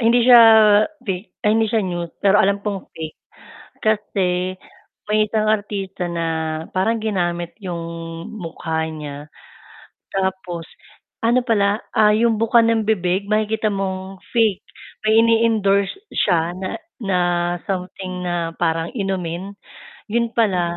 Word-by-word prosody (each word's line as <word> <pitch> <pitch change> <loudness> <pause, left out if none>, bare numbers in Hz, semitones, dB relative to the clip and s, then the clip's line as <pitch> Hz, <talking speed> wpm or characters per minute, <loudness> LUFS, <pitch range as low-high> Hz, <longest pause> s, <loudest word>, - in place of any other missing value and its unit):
hindi 235 +1 +4
siya 245 -2 +9 0.6
fake 190 +1 -4 0.2
ay - - +4
hindi 225 - +2
siya 220 -1 +1
news 175 -2 -3
pero 200 +1 +5
alam 200 +1 +2
kong 200 -3 -4
fake. 155 -1 -7 0.6
Kasi, 185 -4 0 0.5
may 210 0 +2
isang 215 -1 0
artista 200 -4 -2
na 170 -1 -2 0.5
parang 225 +5 +1
ginamit 175 -5 -2
'yong 175 -3 -4 0.4
mukha 165 -5 -4
niya, 150 -1 -8 0.8
tapos, 190 -3 -3 0.6
ano 240 +2 +3
pala, 205 -2 +1
ah, 210 -1 +5
'yong 225 -1 +2
buka 230 0 +5
ng 230 -1 +2
bibig 190 -1 0
makikita 215 0 +1
mong 190 -1 -4 0.2
fake, 220 -5 +2 0.4
may 220 +1 +5
ini-endorse 220 -4 +2 0.2
siya 170 -3 +1
na 190 - -4 0.2
na 190 -3 +1 0.5
something 185 -1 -4
na 170 -2 -2
parang 165 -1 0
inumin. 190 -2 -3 0.6
'Yun 235 -1 +1
pala, 180 -6 +1
195 Hz, 125 wpm, -20 LUFS, 180-215 Hz, 0.8 s, siya